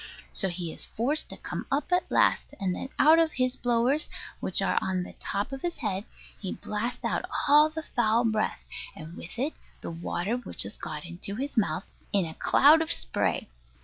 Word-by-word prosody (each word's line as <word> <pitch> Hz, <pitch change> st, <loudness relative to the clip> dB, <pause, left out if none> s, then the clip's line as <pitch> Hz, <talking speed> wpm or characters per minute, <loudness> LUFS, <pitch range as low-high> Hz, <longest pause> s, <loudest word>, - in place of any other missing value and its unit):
So 195 Hz, -, +3 dB
he 175 Hz, -2 st, -4 dB
is -, -, -1 dB
forced 280 Hz, +7 st, 0 dB
to -, -, -8 dB
come -, -, -5 dB
up 280 Hz, +5 st, 0 dB
at 360 Hz, 0 st, +2 dB
last: -, -, +2 dB
and 190 Hz, -2 st, 0 dB
then 265 Hz, -, -5 dB
out 315 Hz, +2 st, +7 dB
of 325 Hz, -2 st, +2 dB
his 255 Hz, 0 st, 0 dB
blowers, 245 Hz, +5 st, +3 dB, 0.3 s
which -, -, 0 dB
are -, -, +2 dB
on 185 Hz, -1 st, -1 dB
the -, -, -9 dB
top 200 Hz, +5 st, -2 dB
of 270 Hz, -1 st, -5 dB
his 345 Hz, -1 st, -3 dB
head, 200 Hz, -2 st, -2 dB, 0.3 s
he 190 Hz, -, -4 dB
blasts 220 Hz, +4 st, -4 dB
out -, -, 0 dB, 0.2 s
all 300 Hz, +2 st, +7 dB
the 315 Hz, 0 st, -6 dB
foul 235 Hz, -3 st, +2 dB
breath, 220 Hz, -1 st, 0 dB, 0.3 s
and 160 Hz, +2 st, -9 dB
with 170 Hz, -, -8 dB
it 280 Hz, +6 st, -1 dB, 0.3 s
the -, -, -5 dB
water 175 Hz, +6 st, -2 dB
which 250 Hz, -, 0 dB
has -, -, -5 dB
got 150 Hz, +1 st, -5 dB
into 175 Hz, +3 st, -5 dB
his 275 Hz, +5 st, -4 dB
mouth, 220 Hz, -4 st, +1 dB, 0.3 s
in 195 Hz, -3 st, +2 dB
a 160 Hz, -, -6 dB
cloud 305 Hz, -, +6 dB
of 325 Hz, +1 st, -1 dB
spray. 95 Hz, -, +1 dB
230 Hz, 200 wpm, -28 LUFS, 185-285 Hz, 0.3 s, out